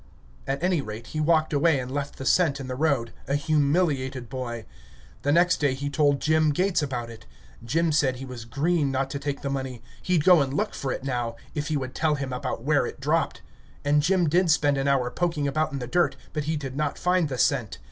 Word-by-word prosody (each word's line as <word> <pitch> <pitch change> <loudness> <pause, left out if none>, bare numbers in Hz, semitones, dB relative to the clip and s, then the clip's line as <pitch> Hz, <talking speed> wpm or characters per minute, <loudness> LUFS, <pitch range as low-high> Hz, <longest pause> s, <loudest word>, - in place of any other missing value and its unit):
At 140 +4 -2
any 180 -4 +2
rate, 110 -1 -7
he 155 - -2
walked 155 0 +2
away 150 +1 +3
and 125 0 -5
left 140 0 -4
the 135 - -6
cent 155 -5 +3
in 135 - -5
the 130 - -3
road, 130 -5 0
a 140 - +1
humiliated 145 -4 +1
boy. 120 -3 -5 0.6
The 145 - +1
next 175 +3 +4
day 140 -3 +1
he 140 +1 -4
told 145 -1 +2
Jim 155 0 +3
Gates 180 +4 +1
about 125 -5 -3
it. 115 -1 -13 0.4
Jim 160 +8 +1
said 135 -4 +2
he 130 +2 -7
was 125 -3 -8
green 145 +4 +1
not 135 0 -1
to 140 - -3
take 140 0 -3
the 140 - -1
money; 130 -3 -4 0.2
he'd 175 -4 +1
go 180 -2 +7
and 135 0 -1
look - - -1
for 135 - -3
it - - -4
now, 120 -3 -2 0.2
if 150 0 -3
he 155 -2 0
would 130 -2 -5
tell 155 -2 +1
him 135 -2 -4
about 125 -2 -4
where 145 +1 +2
it - - -8
dropped. 155 +4 0 0.4
And 145 +1 +4
Jim 180 +2 +2
did 175 +3 +3
spend 145 -2 +3
an 135 - 0
hour 130 -3 +2
poking 165 -3 -1
about 155 +2 0
in 140 - -3
the 125 - -4
dirt, 140 0 +1 0.2
but 150 -1 -2
he 160 0 -1
did 135 -3 -6
not 150 0 -1
find 180 -3 +1
the 130 - -3
cent. 125 -5 +1
140 Hz, 230 wpm, -26 LUFS, 130-155 Hz, 0.6 s, go